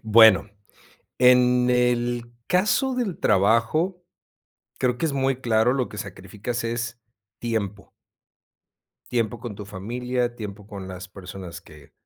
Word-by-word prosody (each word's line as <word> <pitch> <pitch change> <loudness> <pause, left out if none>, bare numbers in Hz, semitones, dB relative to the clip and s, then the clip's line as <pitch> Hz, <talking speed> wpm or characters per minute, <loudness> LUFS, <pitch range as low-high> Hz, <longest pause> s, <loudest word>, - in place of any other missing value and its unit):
Bueno, 110 -2 +6 0.7
en 125 0 +5
el 120 -1 +1 0.2
caso 215 +8 +2
del 230 -8 -2
trabajo, 115 - +2 0.8
creo 125 -1 +1
que 165 - -2
es 160 - +1
muy 135 -1 0
claro, 115 +1 +3
lo 130 -3 0
que 105 - -8
sacrificas 100 +5 -5
es 120 +1 -3 0.4
tiempo 105 -4 -3 1.2
tiempo 115 -1 0
con 120 -3 -6
tu 100 0 -8
familia, 120 +5 -2
tiempo 105 -2 -7
con 100 -3 -8
las 95 +1 -8
personas 95 -2 -9
que 75 -3 -17
120 Hz, 125 wpm, -24 LUFS, 100-125 Hz, 1.2 s, Bueno